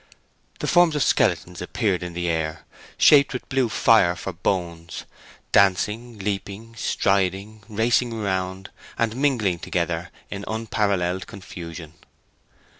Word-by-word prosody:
The - - -1
forms 175 -3 +4
of 150 - +2
skeletons 90 0 +1
appeared 95 0 -1
in 90 -1 -6
the 85 0 -2
air, 80 -1 -2 0.3
shaped 140 -2 +6
with 125 - -5
blue 130 -3 +1
fire 105 -6 +4
for 95 +1 -6
bones—dancing, 95 +5 -1
leaping, 105 +2 -5
striding, 100 0 0
racing 115 +3 +1
around, 95 -3 -3 0.3
and 115 -1 0
mingling 120 -10 +1
altogether 85 0 -2 0.2
in 100 0 -5
unparalleled 100 -5 -1
confusion. 85 -5 -9
100 Hz, 115 wpm, -23 LUFS, 90-110 Hz, 0.3 s, shaped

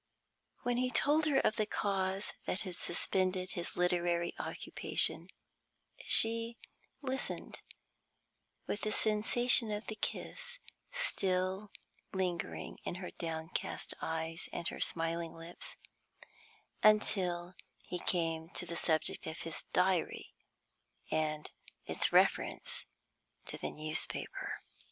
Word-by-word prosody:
When 245 -1 +1
he 255 0 +2
told 295 +5 +3
her 285 -3 +3
of 215 - +1
the 215 - +1
cause 195 -1 0
that 190 - -1
had 185 -3 -4
suspended 185 +1 +1
his 175 -1 -5
literary 175 -1 +1
occupation, - - +1 0.8
she 230 +1 +7 0.5
listened, 265 0 -4 1.0
with 205 - -3
the 215 - -1
sensation 225 +3 +4
of 210 +1 -3
the 220 - -4
kiss 485 - -3 0.3
still 190 - 0 0.4
lingering 180 -3 -2
in - - -3
her 180 0 -6
downcast 160 -1 -4
eyes 160 +1 -2
and 170 - -3
her - - -7
smiling 165 0 0
lips, 165 +1 -7 1.1
until 185 -5 +3 0.3
he 180 - -4
came 165 -2 0
to 180 - -3
the 170 0 -5
subject 160 -2 0
of 160 - -5
his 165 -1 -5
Diary 180 -1 +1 0.8
and 155 -1 -1 0.3
its - - +1
reference - - +2 0.6
to - - -5
the - - -3
newspaper. 155 0 -4
185 Hz, 110 wpm, -34 LUFS, 170-215 Hz, 1.1 s, she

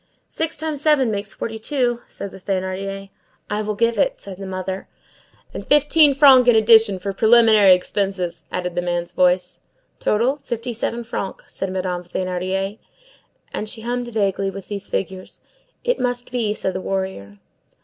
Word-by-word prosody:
"Six 325 0 -3
times 305 -2 -3
seven 295 -6 +3
makes 200 0 -3
forty 225 -1 -5
two," 240 -1 -1
said 200 - -7
the - - -11
Thénardier. 195 +1 -4 0.4
"I 210 +1 0
will 210 0 -3
give 230 0 +1
it," - - +1
said 195 -2 -10
the 195 - -6
mother. 190 0 -5 0.7
"And - - -6
fifteen 295 0 +5
francs 265 -3 +7
in 240 - +6
addition 220 -2 +5
for 195 +2 -4
preliminary 220 -3 +6
expenses," 180 -3 -3
added 180 -1 -3
the 175 - -1
man's 175 -1 -2
voice. 180 0 +1 0.4
"Total, 240 +7 +1
fifty 240 -3 -5
seven 235 +1 -3
francs," 200 -4 -6
said 195 - -3
Madame 185 -1 -3
Thénardier. 185 +3 -3 0.7
And 215 - -4
she 225 - -7
hummed 245 +1 -3
vaguely, 200 -4 0
with 195 -1 -9
these 205 -1 -5
figures:— 190 -1 -5 0.4
"It - - 0
must 245 -1 -2
be, 225 -4 -1
said 190 - -3
a 185 - -3
warrior." 190 - -4
200 Hz, 160 wpm, -21 LUFS, 185-240 Hz, 0.7 s, francs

